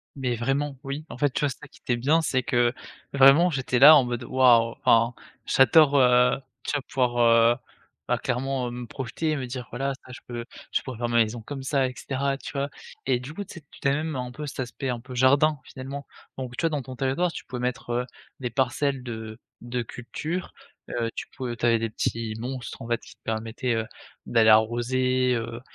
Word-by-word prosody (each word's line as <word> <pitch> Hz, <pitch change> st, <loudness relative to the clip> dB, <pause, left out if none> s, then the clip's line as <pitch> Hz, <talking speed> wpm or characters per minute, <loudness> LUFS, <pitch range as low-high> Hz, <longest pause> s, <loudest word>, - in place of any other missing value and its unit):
Mais 130 Hz, -3 st, -1 dB
vraiment, 135 Hz, +4 st, -1 dB
oui. 140 Hz, +3 st, -5 dB
En -, -, -8 dB
fait, 145 Hz, -2 st, +2 dB
tu -, -, -2 dB
vois, 145 Hz, -, +2 dB
c'est -, -, -8 dB
ça 150 Hz, -, -10 dB
qui -, -, -20 dB
était 120 Hz, -, -1 dB
bien, 145 Hz, +7 st, +3 dB
c'est 130 Hz, -4 st, 0 dB
que 120 Hz, -1 st, +2 dB, 0.4 s
vraiment 140 Hz, +6 st, +7 dB
j'étais 130 Hz, -4 st, 0 dB
là 150 Hz, +3 st, +11 dB
en 140 Hz, -, +6 dB
mode: 120 Hz, 0 st, -3 dB
«Waouh» 120 Hz, -3 st, +5 dB
Enfin, 115 Hz, +1 st, +4 dB, 0.3 s
j'adore, 145 Hz, +2 st, +5 dB
heu, 125 Hz, 0 st, +5 dB, 0.3 s
tu -, -, -2 dB
vois, 145 Hz, -, 0 dB
pouvoir, 125 Hz, -2 st, -1 dB, 0.4 s
heu, -, -, -8 dB, 0.5 s
bah, -, -, +2 dB
clairement, 130 Hz, 0 st, -2 dB
heu, -, -, -5 dB
me 120 Hz, 0 st, -6 dB
projeter, 150 Hz, +6 st, -2 dB
me 130 Hz, -, -3 dB
dire: 125 Hz, -1 st, -6 dB
«Voilà 135 Hz, +3 st, -2 dB
ça, 125 Hz, -, -12 dB
je -, -, -9 dB
peux, 120 Hz, -1 st, -5 dB, 0.3 s
je -, -, +2 dB
pourrais 130 Hz, -4 st, -7 dB
faire 120 Hz, 0 st, -1 dB
ma 120 Hz, -, -2 dB
maison 110 Hz, +1 st, -5 dB
comme 135 Hz, +3 st, -7 dB
ça 135 Hz, -1 st, +1 dB
et 125 Hz, -, -6 dB
cetera». 135 Hz, 0 st, -2 dB
Tu -, -, -8 dB
vois? 140 Hz, 0 st, -2 dB, 0.4 s
Et 130 Hz, -2 st, +2 dB
du 140 Hz, +5 st, -8 dB
coup, 205 Hz, +3 st, -5 dB
tu -, -, -12 dB
sais, 170 Hz, -, -9 dB
tu -, -, -15 dB
tu -, -, 0 dB
avais 140 Hz, +2 st, +3 dB
même 155 Hz, -4 st, -3 dB
un 125 Hz, -1 st, -4 dB
peu 150 Hz, +4 st, -7 dB
cet 140 Hz, -, -7 dB
aspect 130 Hz, +1 st, -4 dB
un 120 Hz, -1 st, -2 dB
peu 125 Hz, +1 st, -10 dB
jardin, 140 Hz, +4 st, +4 dB
finalement. 140 Hz, +2 st, -8 dB, 0.3 s
Donc, 125 Hz, -2 st, -6 dB
tu -, -, -3 dB
vois, 165 Hz, -, +3 dB
dans 150 Hz, -3 st, -2 dB
ton 130 Hz, 0 st, -9 dB
territoire, 135 Hz, +7 st, 0 dB
tu -, -, -8 dB
pouvais 125 Hz, -1 st, -6 dB
mettre, 125 Hz, 0 st, -3 dB
heu, 125 Hz, +1 st, 0 dB, 0.4 s
des 125 Hz, -, -2 dB
parcelles 135 Hz, +1 st, 0 dB
de 110 Hz, -1 st, -7 dB, 0.2 s
de 120 Hz, +1 st, -3 dB
culture, 155 Hz, +10 st, -5 dB, 0.4 s
heu, 115 Hz, -1 st, -1 dB
tu -, -, -5 dB
pou 125 Hz, -2 st, -3 dB
tu 120 Hz, -, -2 dB
avais 115 Hz, -1 st, +4 dB
des 115 Hz, -1 st, -2 dB
petits 115 Hz, 0 st, -2 dB
monstres, 125 Hz, +2 st, -6 dB
en 115 Hz, -, -7 dB
fait, 120 Hz, -, +1 dB
qui -, -, -15 dB
te -, -, -53 dB
permettaient, 115 Hz, +2 st, -2 dB
heu, 110 Hz, 0 st, -1 dB, 0.4 s
d'aller 110 Hz, -2 st, +4 dB
arroser, 125 Hz, +3 st, +3 dB
heu, 115 Hz, +1 st, -4 dB
130 Hz, 230 wpm, -26 LUFS, 120-140 Hz, 0.5 s, là